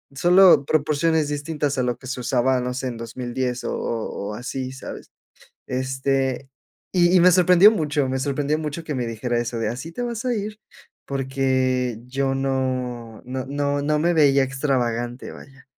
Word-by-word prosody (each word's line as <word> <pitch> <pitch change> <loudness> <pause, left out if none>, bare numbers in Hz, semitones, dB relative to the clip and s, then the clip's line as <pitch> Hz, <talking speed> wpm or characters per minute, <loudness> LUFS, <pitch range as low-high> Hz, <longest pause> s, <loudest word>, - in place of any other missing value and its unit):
solo 180 -2 +6
proporciones 155 +1 +1
distintas 145 -1 -2
a 130 - +1
lo 125 -1 -1
que 130 - -12
se 130 0 -4
usaba, 130 +1 +1
no 125 0 -3
sé, 130 0 -3
en 120 -2 -5
2010, 125 +1 -4
o - - -2
o 110 -3 -4
o - - -6
así, 130 +2 -5
¿sabes? 130 - -9 0.6
Este, 130 0 -1 0.4
y 175 0 +4
y - - +6
me 180 +1 +7
sorprendió 180 +3 +7
mucho, 150 -7 0
me 130 0 -1
sorprendió 145 +2 -1
mucho 155 +1 -4
que 150 - -4
me 125 -2 -2
dijera 120 +1 -2
eso 120 0 -3
de: 110 -1 -1
"¿Así 130 +8 -6
te 245 - -4
vas 235 -1 -4
a 250 -1 +1
ir?", 210 0 -4 0.5
porque 130 -3 0
yo 135 +1 -1
no, 130 -4 -2
no, 130 +1 -5
no, 145 0 -1
no 150 +1 +1
me 170 +3 +2
veía 140 -3 +5
extravagante, 125 -3 -2
vaya. 140 +1 -14
135 Hz, 175 wpm, -23 LUFS, 125-150 Hz, 0.6 s, me